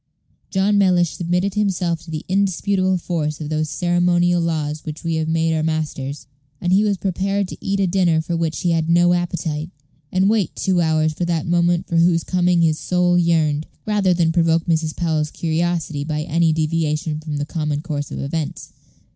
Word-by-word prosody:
John 200 Hz, +1 st, +2 dB
Mellish 180 Hz, -4 st, +3 dB
submitted 180 Hz, +3 st, -1 dB
himself 185 Hz, -5 st, 0 dB
to 165 Hz, -, -14 dB
the 155 Hz, -1 st, -5 dB
indisputable 190 Hz, 0 st, +1 dB
force 155 Hz, -4 st, -3 dB
of 150 Hz, -2 st, -5 dB
those 155 Hz, 0 st, -1 dB
ceremonial 175 Hz, 0 st, +2 dB
laws 155 Hz, -2 st, -2 dB
which 155 Hz, 0 st, -7 dB
we 165 Hz, -1 st, -1 dB
have 160 Hz, 0 st, -1 dB
made 165 Hz, 0 st, +1 dB
our 160 Hz, -, 0 dB
masters, 150 Hz, -4 st, -3 dB, 0.3 s
and 175 Hz, +1 st, 0 dB
he 200 Hz, +2 st, +4 dB
was 205 Hz, -2 st, +1 dB
prepared 195 Hz, +1 st, -1 dB
to -, -, -8 dB
eat 200 Hz, 0 st, -1 dB
a 195 Hz, -, +3 dB
dinner 175 Hz, -3 st, +2 dB
for 165 Hz, +2 st, -2 dB
which 165 Hz, -1 st, -2 dB
he 175 Hz, -, +1 dB
had 165 Hz, -1 st, 0 dB
no 175 Hz, +1 st, +4 dB
appetite, 170 Hz, -3 st, -2 dB, 0.4 s
and 185 Hz, +1 st, +2 dB
wait 210 Hz, -5 st, +1 dB
two 185 Hz, -2 st, +1 dB
hours 155 Hz, -1 st, +1 dB
for 175 Hz, +3 st, -2 dB
that 170 Hz, -3 st, -1 dB
moment 175 Hz, 0 st, +2 dB
for 170 Hz, -, -1 dB
whose 165 Hz, 0 st, +3 dB
coming 180 Hz, -1 st, +2 dB
his 155 Hz, -1 st, +2 dB
soul 180 Hz, -1 st, +1 dB
yearned, 160 Hz, -3 st, +2 dB, 0.2 s
rather 205 Hz, -3 st, +2 dB
than 170 Hz, -2 st, +2 dB
provoke 165 Hz, -1 st, +2 dB
Mrs. 160 Hz, -2 st, 0 dB
Powell's 155 Hz, -3 st, 0 dB
curiosity 165 Hz, -2 st, -1 dB
by 150 Hz, 0 st, -2 dB
any 165 Hz, +1 st, +2 dB
deviation 155 Hz, -1 st, -1 dB
from 155 Hz, -2 st, -5 dB
the 145 Hz, -, -2 dB
common 150 Hz, -2 st, -3 dB
course 145 Hz, -3 st, -4 dB
of -, -, -6 dB
events. 150 Hz, +2 st, -4 dB
170 Hz, 190 wpm, -20 LUFS, 155-180 Hz, 0.4 s, he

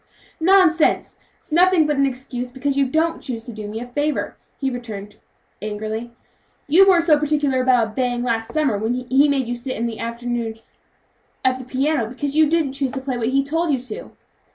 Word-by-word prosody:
"Nonsense! 345 Hz, -2 st, +3 dB, 0.2 s
that's -, -, -26 dB
nothing 355 Hz, 0 st, +5 dB
but 300 Hz, 0 st, +1 dB
an 275 Hz, 0 st, +3 dB
excuse 250 Hz, -1 st, -5 dB
because 275 Hz, +2 st, -2 dB
you 275 Hz, -1 st, +2 dB
don't 320 Hz, +5 st, 0 dB
choose 230 Hz, -4 st, -4 dB
to 235 Hz, -, -9 dB
do 215 Hz, -1 st, -7 dB
me 215 Hz, +2 st, -5 dB
a 240 Hz, -, -6 dB
favor," 290 Hz, +4 st, -2 dB, 0.2 s
returned 240 Hz, -7 st, -4 dB
the -, -, -24 dB
boy -, -, -35 dB, 0.4 s
angrily; 215 Hz, +3 st, -4 dB, 0.6 s
"you 375 Hz, +7 st, +6 dB
weren't 350 Hz, -3 st, +5 dB
so 310 Hz, -3 st, +4 dB
particular 290 Hz, -3 st, +1 dB
about 250 Hz, -3 st, +3 dB
obeying 245 Hz, +1 st, -1 dB
last 225 Hz, -2 st, -1 dB
summer 275 Hz, -10 st, +1 dB
when 225 Hz, +3 st, -1 dB
he 260 Hz, +3 st, +2 dB
made 270 Hz, -3 st, +1 dB
you 245 Hz, -, -2 dB
sit 255 Hz, +2 st, -5 dB
all 235 Hz, -, 0 dB
the 230 Hz, -2 st, -4 dB
afternoon 235 Hz, -1 st, -3 dB, 0.9 s
at 255 Hz, 0 st, +2 dB
the 255 Hz, -, -8 dB
piano, 270 Hz, -1 st, 0 dB
because 275 Hz, +4 st, -4 dB
you 310 Hz, -1 st, +5 dB
didn't 315 Hz, -4 st, +1 dB
choose 270 Hz, -1 st, -2 dB
to 270 Hz, -, -3 dB
play 265 Hz, -1 st, -3 dB
what 235 Hz, -2 st, -1 dB
he 275 Hz, +1 st, +2 dB
told 325 Hz, +3 st, 0 dB
you 275 Hz, -, +2 dB
to." 245 Hz, -3 st, -8 dB
260 Hz, 200 wpm, -21 LUFS, 240-295 Hz, 0.9 s, you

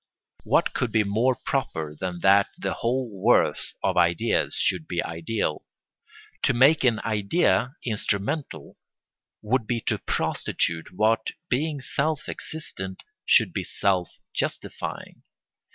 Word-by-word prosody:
What -, -, +2 dB
could 125 Hz, -3 st, -1 dB
be 110 Hz, -1 st, +3 dB
more 115 Hz, +6 st, +2 dB
proper 80 Hz, -, -3 dB
than 90 Hz, +1 st, -5 dB
that 100 Hz, +1 st, +5 dB
the -, -, -2 dB
whole 125 Hz, +2 st, -1 dB
worth 95 Hz, -9 st, +3 dB
of -, -, +1 dB
ideas 85 Hz, -1 st, +2 dB
should 90 Hz, -4 st, 0 dB
be 85 Hz, -, -1 dB
ideal? 85 Hz, 0 st, -2 dB, 0.8 s
To -, -, +2 dB
make 140 Hz, +6 st, +5 dB
an 120 Hz, -4 st, +3 dB
idea 110 Hz, -, +1 dB
instrumental 100 Hz, -, -2 dB, 0.7 s
would 115 Hz, +1 st, 0 dB
be 120 Hz, -1 st, 0 dB
to -, -, 0 dB
prostitute 80 Hz, -1 st, -1 dB
what, 110 Hz, +3 st, +1 dB, 0.2 s
being 145 Hz, +2 st, 0 dB
self 150 Hz, +3 st, -1 dB
existent, 95 Hz, -12 st, -5 dB, 0.2 s
should -, -, +5 dB
be -, -, -2 dB
self 95 Hz, -3 st, 0 dB, 0.2 s
justifying. -, -, -4 dB
110 Hz, 120 wpm, -25 LUFS, 90-130 Hz, 0.8 s, that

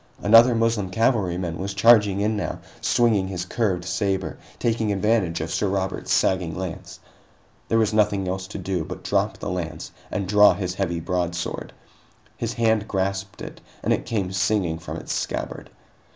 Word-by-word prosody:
Another 115 Hz, +3 st, +7 dB
Moslem 115 Hz, -4 st, +1 dB
cavalryman 90 Hz, -6 st, 0 dB
was 100 Hz, +1 st, -4 dB
charging 105 Hz, -2 st, +5 dB
in 110 Hz, +1 st, +1 dB
now, 105 Hz, -, -3 dB, 0.2 s
swinging 110 Hz, -5 st, +2 dB
his 90 Hz, -2 st, -4 dB
curved 95 Hz, -4 st, -1 dB
saber, 95 Hz, 0 st, -1 dB, 0.2 s
taking 115 Hz, -2 st, 0 dB
advantage 100 Hz, -5 st, +1 dB
of 80 Hz, +1 st, -4 dB
Sir 90 Hz, +4 st, 0 dB
Robert's 95 Hz, 0 st, -2 dB
sagging 90 Hz, -4 st, +2 dB
lance. 90 Hz, -2 st, -6 dB, 0.7 s
There 115 Hz, -, +2 dB
was 110 Hz, -1 st, +2 dB
nothing 100 Hz, -3 st, +2 dB
else 95 Hz, +1 st, -3 dB
to 105 Hz, -, -7 dB
do 95 Hz, -3 st, -2 dB
but -, -, -8 dB
drop -, -, 0 dB
the -, -, -4 dB
lance 90 Hz, -3 st, -5 dB, 0.2 s
and 100 Hz, -3 st, -3 dB
draw 105 Hz, -1 st, +6 dB
his 90 Hz, -1 st, -3 dB
heavy 90 Hz, -3 st, -2 dB
broadsword. 85 Hz, 0 st, -3 dB, 0.6 s
His -, -, -3 dB
hand 110 Hz, -2 st, +1 dB
grasped 95 Hz, 0 st, -2 dB
it, -, -, -9 dB, 0.2 s
and -, -, +2 dB
it -, -, -3 dB
came 100 Hz, -6 st, -1 dB
singing 95 Hz, -4 st, 0 dB
from -, -, -6 dB
its -, -, -5 dB
scabbard. -, -, -4 dB
95 Hz, 165 wpm, -24 LUFS, 90-105 Hz, 0.7 s, Another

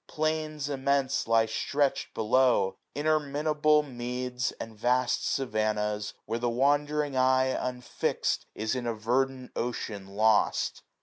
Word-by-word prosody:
Plains 155 Hz, -1 st, -2 dB
immense 140 Hz, -2 st, 0 dB
Lie 115 Hz, 0 st, +4 dB
stretch'd 140 Hz, +5 st, -1 dB
below, 110 Hz, -3 st, +3 dB, 0.2 s
interminable 150 Hz, 0 st, +2 dB
meads, 125 Hz, -1 st, -3 dB
691 115 Hz, -, -5 dB
And 105 Hz, -, -21 dB
vast 125 Hz, 0 st, +1 dB
savannahs, 105 Hz, -4 st, -1 dB
where 115 Hz, +2 st, -2 dB
the 120 Hz, 0 st, 0 dB
wandering 145 Hz, +3 st, +1 dB
eye, 130 Hz, 0 st, +3 dB
Unfixt, 125 Hz, -1 st, -2 dB
is 110 Hz, +2 st, -1 dB
in 125 Hz, -2 st, -3 dB
a 115 Hz, -, -1 dB
verdant 130 Hz, +4 st, -1 dB
ocean 110 Hz, -4 st, -4 dB
lost. 110 Hz, 0 st, +2 dB
130 Hz, 120 wpm, -28 LUFS, 115-140 Hz, 0.2 s, Lie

